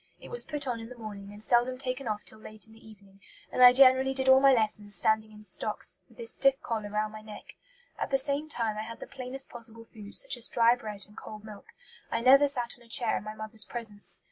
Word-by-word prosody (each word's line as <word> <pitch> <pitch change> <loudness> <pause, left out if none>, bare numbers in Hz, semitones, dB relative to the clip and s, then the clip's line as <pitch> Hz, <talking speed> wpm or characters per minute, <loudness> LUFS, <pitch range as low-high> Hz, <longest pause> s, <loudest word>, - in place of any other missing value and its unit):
It - - -12
was 485 - -2
put 295 -2 -2
on 240 -2 -2
in 225 0 -9
the 250 - -11
morning, 205 -3 -8
and 205 +1 0
seldom 245 +2 +2
taken 255 0 -4
off 210 -1 -3
till 220 - -11
late 215 0 -7
in 220 - -18
the 225 - -18
evening, 200 -2 -17 0.3
and - - -1
I 250 0 +11
generally 265 +1 +5
did 265 0 0
all 265 0 +8
my 275 0 +6
lessons 215 -4 +2
standing 220 +3 +2
in 210 0 -14
stocks, - - -3
with - - -22
this 465 -1 -3
stiff 275 0 +3
collar 220 -3 -3
round 215 +1 -2
my 215 - -9
neck. 215 -1 -11 0.5
At - - -2
the 270 - +2
same 280 +3 +1
time 225 -6 -2
I - - -1
had 230 +1 -8
the - - -7
plainest 265 0 -6
possible 230 -1 -10
food, 210 -2 -5
such 270 - -2
as 235 - +1
dry 235 0 +4
bread 215 -4 -6
and 210 - -19
cold 215 -1 -10
milk. 210 -2 -11 0.4
I 230 - -1
never 270 +4 +6
sat 245 -4 -4
on - - -19
a 230 - -21
chair 230 0 0
in - - -3
my 215 0 -7
mother's 215 0 -3
presence. 220 -4 -8
230 Hz, 250 wpm, -29 LUFS, 215-260 Hz, 0.5 s, I